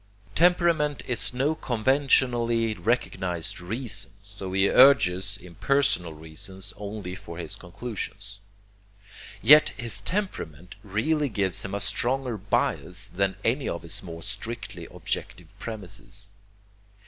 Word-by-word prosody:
Temperament 170 -4 +3
is 120 -2 +1
no 135 +5 +1
conventionally 120 -3 +2
recognized 95 -5 -1
reason, 105 +2 -1
so 100 -2 -7
he 95 +1 +4
urges 100 -8 +5
impersonal 90 - +1
reasons 90 +5 -8
only 100 -2 -6
for 85 -2 -9
his 85 -3 -5
conclusions. 100 0 -7 1.0
Yet 150 +2 +8
his 120 -3 -1
temperament 90 - -3
really 130 +9 0
gives 100 -4 0
him 100 0 -4
a - - -1
stronger 125 +4 0
bias 100 0 -1
than 95 0 0
any 130 +5 +1
of 85 - -4
his 85 - -4
more 85 -3 -8
strictly 110 +2 -4
objective - - -4
premises. 100 -1 -3
105 Hz, 110 wpm, -26 LUFS, 95-125 Hz, 1.0 s, Yet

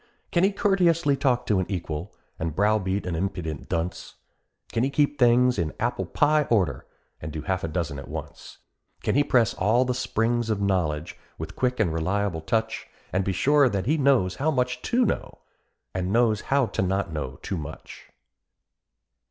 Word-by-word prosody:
Can 175 - +2
he 195 - +4
courteously 175 -7 +2
talk 130 -3 +1
to 105 -3 +2
an 95 - -1
equal, 85 -2 -4 0.3
and 80 -2 -3
browbeat 100 -1 +1
an 90 - -2
impudent 85 -4 -4
dunce? 85 +2 -3 0.6
Can 115 - 0
he 135 - +2
keep 145 0 +1
things 125 -1 +4
in 80 -2 -1
apple - - -1
pie 150 0 +2
order, 90 - +1 0.3
and 75 - -5
do 75 0 -5
half 95 0 -1
a - - -1
dozen 80 -3 -3
at 70 - -9
once? - - -8 0.5
Can - - +1
he 145 - +4
press 120 -7 +3
all 115 +7 +2
the 125 - 0
springs 120 -1 0
of 110 -2 0
knowledge, 90 -5 -1 0.2
with - - -7
quick 125 -1 0
and 90 -8 +2
reliable 90 +1 -1
touch, 110 +5 -1 0.3
And 95 +1 +2
be 95 - -1
sure 140 +6 +4
that 100 -4 -2
he 150 +6 +2
knows 130 - +2
how 150 +4 +1
much 125 -4 0
to 250 0 +3
know, - - -2 0.6
and 95 0 -2
knows 115 -2 +3
how 140 -1 +3
to - - -3
not 95 -2 -1
know 70 -4 -4
too 95 - -3
much? 80 +1 -9
105 Hz, 180 wpm, -25 LUFS, 90-130 Hz, 0.6 s, he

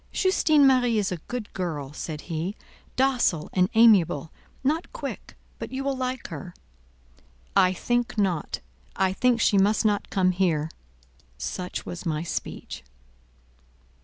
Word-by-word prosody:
"Justine 310 -6 +4
Marie 250 -4 +4
is 200 -3 0
a 180 - -2
good 245 -4 -5
girl," 150 -7 -4
said 150 -1 -5
he, 170 +4 -4 0.4
"docile 250 - +1
and 180 0 +3
amiable; 195 -9 +5 0.3
not 310 +5 0
quick—but - - -8
you 265 +1 -3
will 275 0 0
like 255 0 -3
her." 180 -2 -8 1.0
"I 185 -2 +5
think 240 +5 -1
not. 185 -6 0 0.3
I 190 -1 +1
think 245 +3 +2
she 205 -3 +4
must 210 +3 +3
not 205 -1 +1
come 185 -1 +2
here." 165 -4 0 0.7
Such 180 - -4
was 175 - -6
my 155 -3 -1
speech. 170 - -5
195 Hz, 135 wpm, -26 LUFS, 175-250 Hz, 1.0 s, amiable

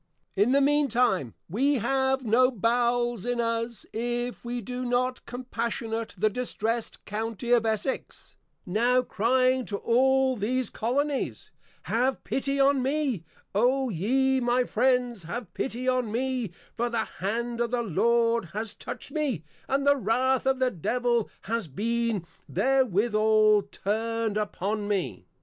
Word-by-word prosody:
In 205 +5 +3
the 280 +1 +4
mean 290 +1 +3
time, 190 - +1
We 270 - +2
have 265 +2 +1
no 245 +3 +5
Bowels 240 -1 +1
in 245 0 -1
us, 230 -1 -2
if 240 +2 -3
we 245 0 -3
do 250 +3 -5
not 250 +1 0
Compassionate 230 -2 -3
the 215 +4 +3
Distressed 230 0 -2
County 225 +2 -3
of 235 -2 +4
Essex, 220 +5 -3 0.3
now 240 +7 +2
crying 255 +3 +2
to 200 - -3
all 265 +3 +3
these 250 +4 -1
Colonies, 275 +5 -2 0.3
_Have 250 +3 0
pity 275 +1 -1
on 275 0 +4
me, 265 - -1 0.3
O 255 +5 +2
ye 260 +8 +2
my 245 0 +2
Friends, 245 -2 +1
Have 220 +4 -6
pity 255 -1 -3
on 255 -4 +1
me, 250 -1 -1 0.3
for 240 +1 0
the 230 -2 -1
Hand 235 +5 -3
of 235 - +1
the 240 0 0
Lord 230 +2 +2
has 215 +1 -3
Touched - - -7
me, 280 - -1 0.2
and 275 +1 0
the 285 0 +5
Wrath 260 +3 +1
of 265 0 +3
the 255 -1 +1
Devil 235 +4 0
has 225 -2 -2
been 225 - -1 0.2
therewithal 215 -2 +3
turned 225 +1 -1
upon 210 0 -2
me. 200 -4 -2
240 Hz, 140 wpm, -27 LUFS, 220-255 Hz, 0.3 s, no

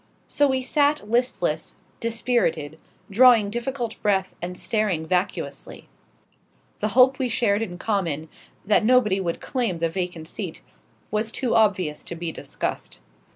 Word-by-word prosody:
So 290 - +2
we 260 -1 0
sat 290 -3 +1
listless, 210 -9 0 0.2
dispirited, 220 -10 -1 0.3
drawing 225 -2 +6
difficult 240 0 -4
breath 190 -2 +1
and 180 +1 -5
staring 205 -8 -1
vacuously. 180 +3 -3 0.9
The 210 - 0
hope 260 +2 +6
we 255 -2 0
shared 220 -3 +1
in 180 -6 -4
common 170 -7 -1 0.4
that 210 +1 +3
nobody 215 -5 +3
would 170 -2 -3
claim 235 -10 -1
the 165 0 0
vacant 175 -2 -4
seat - - -6 0.5
was 215 +1 0
too 255 -1 -1
obvious 185 -9 +2
to 170 - -6
be 170 0 -4
discussed. - - -5
210 Hz, 135 wpm, -24 LUFS, 175-240 Hz, 0.9 s, drawing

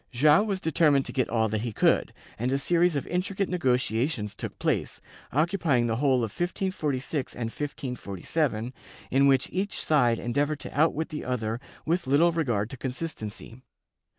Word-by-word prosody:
Joao 150 +7 +5
was 205 -3 -1
determined 150 -4 +3
to - - -6
get 130 -3 0
all 110 -1 +2
that 110 0 -1
he 120 0 -3
could, - - +2 0.3
and 125 +3 0
a 135 - +2
series 170 +3 +2
of 140 - -1
intricate 190 +2 -1
nego 165 -9 +2
tiations 115 -3 -1
took - - -6
place, - - -1 0.3
occupying 155 -5 +2
the 115 -1 0
whole 130 -2 +2
of 110 - -2
1546 155 - -2
and 115 -2 -3
1547, 125 - -3 0.4
inwhich 135 -1 +4
each 195 +2 -2
side 125 -7 +3
endeavored 145 +6 -1
to - - -8
outwit 160 +1 +2
the 150 - -5
other 115 -2 -2 0.3
with 170 -2 0
little 155 +6 +4
regard 120 -10 -1
to 135 - -7
con 130 - -3
sistency. 125 -4 -6
135 Hz, 165 wpm, -27 LUFS, 120-160 Hz, 0.4 s, Joao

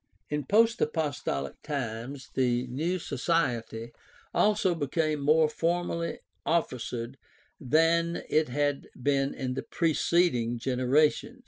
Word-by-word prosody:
In 150 -2 -1
post 225 - +3
apostolic 145 - -2
times 130 -2 -5
the 125 -1 +1
new 155 +9 -1
society 120 -8 -1 0.4
also 205 -3 +3
became 155 0 -1
more 155 +2 +4
formally 170 +1 -1 0.3
officered 125 -6 -2 0.4
than 165 +4 +2
it 155 -3 +2
had 145 +2 -1
been 135 +1 +1
in 130 -1 -3
the 135 - -3
preceding 160 -7 +1
genera 130 +5 +3
tion. - - -10
145 Hz, 110 wpm, -28 LUFS, 125-165 Hz, 0.4 s, more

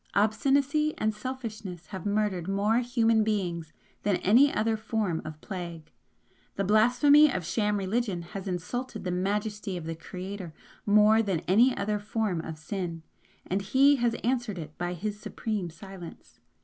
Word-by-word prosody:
Obstinacy 280 +8 +2
and 215 0 0
selfishness 215 -7 -6
have 195 +1 -5
murdered 200 -4 0
more 205 +4 +2
human 230 -3 +2
beings 175 -7 -2 0.3
than 205 -2 +1
any 250 +9 +5
other 220 +1 +1
form 215 -6 -1
of 155 0 -8
plague. 170 -5 -7 0.6
The 195 - -1
blasphemy 250 +9 +5
of 185 -3 -3
sham 210 +1 0
religion 195 -2 -1
has 190 +3 -7
insulted 205 +5 -4
the 180 - -2
majesty 205 +1 -2
of 170 - -6
the 165 - -3
Creator 185 +1 -7 0.3
more 210 +2 +6
than 190 -7 -1
any 240 +7 +4
other 210 +1 -1
form 210 -4 -1
of 160 -1 -6
sin, 170 -1 -5 0.4
and 190 +2 -1
He 275 +8 +4
has 235 -2 +1
answered 240 -4 0
it 155 -2 -8
by 175 0 -2
His 205 +4 -4
Supreme 210 -3 -3
Silence. 175 +1 -11
205 Hz, 150 wpm, -28 LUFS, 180-225 Hz, 0.6 s, more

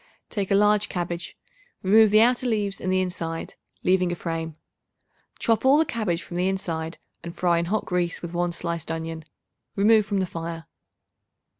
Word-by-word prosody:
Take 200 -4 -2
a 195 - +3
large 210 0 +3
cabbage; 175 -1 -4 0.5
remove 215 +3 +6
the 215 +1 +6
outer 250 +2 +3
leaves 205 -4 -1
and 185 - -1
the 185 0 +2
inside, 165 -3 -4 0.3
leaving 185 -1 +2
a - - -1
frame. 165 -2 -4 0.8
Chop 225 -1 +1
all 270 +2 +6
the 320 - +4
cabbage 200 - -2
from 175 - -7
the 180 +1 +1
inside 165 -4 -3 0.3
and 170 +1 -7
fry 175 -1 +2
in 170 - -1
hot 210 +5 -1
grease 180 -2 -1
with 170 0 -7
1 175 0 0
sliced 170 -1 -3
onion. 160 -1 -4 0.5
Remove 215 +2 +5
from 200 -2 0
the 190 - +1
fire. 165 -1 -6
180 Hz, 175 wpm, -25 LUFS, 170-205 Hz, 0.8 s, remove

